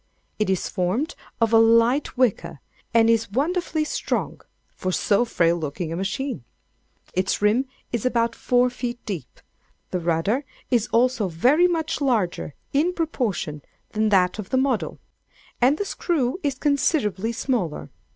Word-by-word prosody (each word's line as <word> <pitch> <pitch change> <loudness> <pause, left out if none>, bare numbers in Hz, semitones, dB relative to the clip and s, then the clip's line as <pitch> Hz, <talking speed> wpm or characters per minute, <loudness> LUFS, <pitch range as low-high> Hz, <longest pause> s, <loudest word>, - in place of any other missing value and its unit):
It 215 - +1
is 190 -2 0
formed 195 - -1 0.3
of 230 -1 +2
a 225 - +8
light 230 +5 +3
wicker, 235 - +1 0.3
and 230 -1 +5
is 230 -1 +2
wonderfully 315 - 0
strong, 305 - -2 0.3
for 185 - -2
so 205 +5 +2
frail 170 -7 +2
looking 160 +1 -4
a - - -2
machine. 205 - -3 0.7
Its 185 +1 0
rim 215 +6 +3 0.3
is 235 -3 -2
about 235 -2 +1
four 250 0 +2
feet 245 -1 -4
deep. 170 - -6 0.5
The 180 - -1
rudder 170 - 0 0.3
is 240 -2 +2
also 235 -3 +2
very 255 - +4
much 330 -3 -2
larger, 210 - 0 0.2
in 315 +6 +2
proportion, 225 - -2 0.3
than 215 0 +1
that 185 0 +3
of 195 - -6
the 260 - +1
model; 260 -3 0 0.6
and 265 +5 +4
the 410 - -2
screw 315 -6 -1
is 285 -5 -1
considerably 260 - +1
smaller. 230 - -2
230 Hz, 145 wpm, -24 LUFS, 190-270 Hz, 0.7 s, a